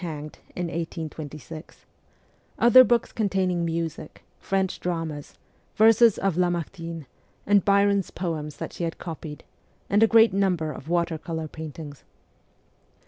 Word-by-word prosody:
hanged 155 Hz, -3 st, -6 dB, 0.2 s
in 180 Hz, -, -3 dB
1826; 160 Hz, -2 st, -7 dB, 0.7 s
other 250 Hz, +2 st, +8 dB
books 240 Hz, -1 st, +1 dB
containing 190 Hz, -5 st, 0 dB
music, 165 Hz, -2 st, -4 dB, 0.2 s
French 190 Hz, -1 st, -1 dB
dramas, 165 Hz, -4 st, -4 dB, 0.4 s
verses 225 Hz, 0 st, +6 dB
of 195 Hz, -1 st, 0 dB
CHILDHOOD 175 Hz, 0 st, +1 dB
16 165 Hz, +1 st, -10 dB
Lamartine, 160 Hz, -3 st, -9 dB, 0.4 s
and 200 Hz, -2 st, +4 dB
Byron's 200 Hz, -1 st, +3 dB
poems 155 Hz, -5 st, -4 dB
that -, -, -6 dB
she -, -, -5 dB
had 165 Hz, -1 st, -3 dB
copied; 155 Hz, -3 st, -8 dB, 0.5 s
and 205 Hz, +2 st, +4 dB
a 225 Hz, -, +7 dB
great 225 Hz, -2 st, +5 dB
number 180 Hz, -5 st, +1 dB
of 150 Hz, +1 st, -9 dB
water 170 Hz, -2 st, 0 dB
colour 160 Hz, -1 st, -4 dB
paintings. 155 Hz, -2 st, -9 dB
170 Hz, 135 wpm, -25 LUFS, 160-195 Hz, 0.7 s, other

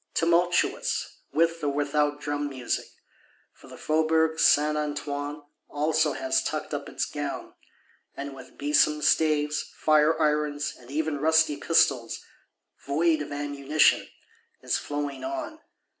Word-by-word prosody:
Tumultuous, 175 Hz, +1 st, +1 dB
with 165 Hz, +1 st, +1 dB
or 145 Hz, -, +1 dB
without 145 Hz, +1 st, 0 dB
drum 145 Hz, 0 st, -3 dB
music: 130 Hz, -3 st, -3 dB, 0.7 s
for -, -, -18 dB
the -, -, -12 dB
Faubourg 160 Hz, +1 st, +1 dB
Saint 150 Hz, +1 st, +4 dB
Antoine 145 Hz, 0 st, -4 dB, 0.3 s
also 155 Hz, 0 st, +1 dB
has 130 Hz, 0 st, 0 dB
tucked -, -, -4 dB
up -, -, -4 dB
its -, -, -2 dB
gown; -, -, -5 dB, 0.6 s
and, 140 Hz, 0 st, -5 dB
with 130 Hz, -1 st, -13 dB
besom 150 Hz, +1 st, +2 dB
staves, 150 Hz, -1 st, +2 dB, 0.2 s
fire 155 Hz, +1 st, +3 dB
irons, 150 Hz, -2 st, 0 dB
and 120 Hz, 0 st, -17 dB
even 150 Hz, 0 st, -2 dB
rusty 160 Hz, 0 st, +3 dB
pistols 135 Hz, -6 st, +1 dB, 0.6 s
(void 155 Hz, +2 st, +1 dB
of 145 Hz, -, -6 dB
ammunition), 145 Hz, +1 st, +2 dB, 0.6 s
is -, -, 0 dB
flowing 145 Hz, -1 st, -4 dB
on. 325 Hz, -2 st, -5 dB
150 Hz, 125 wpm, -26 LUFS, 145-160 Hz, 0.7 s, Saint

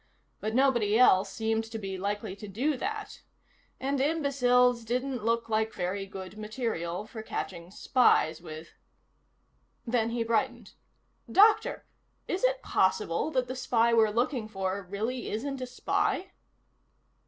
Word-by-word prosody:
But 220 Hz, +1 st, -3 dB
nobody 240 Hz, -6 st, +3 dB
else 195 Hz, -5 st, +5 dB
seemed 225 Hz, +1 st, -1 dB
to 225 Hz, 0 st, -6 dB
be 195 Hz, -3 st, -5 dB
likely 200 Hz, +1 st, -3 dB
to 210 Hz, -, -8 dB
do 255 Hz, +10 st, 0 dB
that. 425 Hz, -, -5 dB, 0.6 s
And 270 Hz, +1 st, -1 dB
imbeciles 250 Hz, -5 st, +3 dB
didn't 250 Hz, +1 st, -2 dB
look 230 Hz, +1 st, 0 dB
like 220 Hz, 0 st, 0 dB
very 195 Hz, +2 st, -2 dB
good 190 Hz, +1 st, -9 dB
material 210 Hz, -5 st, -3 dB
for 220 Hz, 0 st, -8 dB
catching 175 Hz, -5 st, -5 dB
spies 190 Hz, -7 st, +2 dB
with. 160 Hz, -1 st, -9 dB, 1.2 s
Then 230 Hz, -2 st, +1 dB
he 230 Hz, 0 st, -1 dB
brightened. 225 Hz, -1 st, -1 dB, 0.6 s
"Doctor, 420 Hz, +2 st, +4 dB, 0.4 s
is 370 Hz, -, -2 dB
it -, -, +2 dB
possible 185 Hz, -, +1 dB
that 255 Hz, -5 st, 0 dB
the 255 Hz, -, -4 dB
spy 235 Hz, -2 st, +2 dB
we're 220 Hz, -2 st, +5 dB
looking 235 Hz, +1 st, -1 dB
for 195 Hz, -1 st, -3 dB
really 225 Hz, +6 st, -3 dB
isn't 265 Hz, +5 st, -3 dB
a 255 Hz, -, -3 dB
spy?" 395 Hz, +8 st, -1 dB
230 Hz, 135 wpm, -29 LUFS, 200-255 Hz, 1.2 s, else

